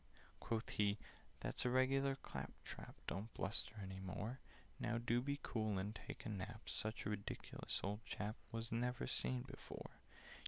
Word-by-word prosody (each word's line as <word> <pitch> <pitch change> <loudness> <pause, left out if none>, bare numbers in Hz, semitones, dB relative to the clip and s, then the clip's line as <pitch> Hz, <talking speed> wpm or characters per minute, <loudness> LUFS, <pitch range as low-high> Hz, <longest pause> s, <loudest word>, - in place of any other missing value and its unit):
Quoth 115 0 +1
he 105 0 +4 0.4
"That's - - +2
regular 135 +2 +5
clap - - -4
trap: - - -6
Don't 105 +5 -1
bluster 105 +3 0
any 95 0 -3
more. 105 +7 -2 0.4
Now 120 -1 +2
do 120 +1 +4
be 140 +2 +1
cool 110 -3 +2
and 100 +3 +1
take - - -6
a - - 0
nap! 110 +2 -2
Such 110 +1 0
a 105 - +2
ridiculous 100 -1 -1
old 105 +3 0
chap 105 +1 -1 0.2
Was 115 0 -1
never 120 - +2
seen 60 0 +2
before! - - -7
110 Hz, 155 wpm, -44 LUFS, 100-120 Hz, 0.4 s, regular